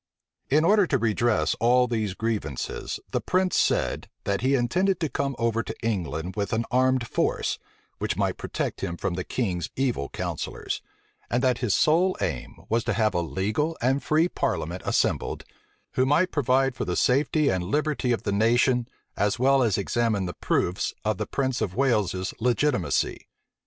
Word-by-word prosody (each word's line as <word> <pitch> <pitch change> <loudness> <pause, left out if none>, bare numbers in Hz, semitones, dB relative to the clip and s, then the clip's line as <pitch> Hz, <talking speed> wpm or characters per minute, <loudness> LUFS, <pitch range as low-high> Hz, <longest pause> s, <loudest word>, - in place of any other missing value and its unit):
In 155 +4 +4
order 205 0 +5
to 140 - +2
redress 110 -7 +1
all 125 +2 +4
these 110 -5 -2
grievances, 105 - -3
the - - 0
prince 185 0 +1
said, - - +1
that 100 0 -1
he 135 +2 +3
intended 180 +10 +1
to 160 - -1
come 140 +1 -2
over 115 -1 +1
to - - -6
England 90 -5 -2
with 100 0 -2
an 115 +1 0
armed 130 -1 +2
force, - - 0 0.4
which - - -2
might - - 0
protect - - -4
him 85 0 -3
from 90 - -2
the 90 +1 -3
king's 90 -9 -2
evil 125 - -1
counsellors; - - -4 0.5
and 120 +2 0
that 125 -2 +2
his 120 -6 +1
sole 175 +5 +3
aim - - -4
was 115 +1 +1
to 120 - +1
have 110 -3 +2
a 85 - +1
legal 105 - -1
and 135 +3 +1
free 155 +3 +2
parliament 90 - -2
assembled, - - 0 0.5
who 130 - +2
might 155 +7 +3
provide 135 -1 +2
for 110 - -4
the 90 - -2
safety 145 +3 +2
and 95 -1 0
liberty 145 - 0
of 120 - 0
the 100 - -1
nation, 120 +4 +3 0.3
as 105 +2 +1
well 135 +2 +4
as 110 -6 +2
examine 105 0 0
the 90 - -4
proofs 90 +3 -1
of 110 -3 0
the - - -2
prince 130 -3 -1
of 90 - -2
Wales's 105 -8 +1
legitimacy. 125 -3 0
120 Hz, 170 wpm, -26 LUFS, 100-135 Hz, 0.5 s, order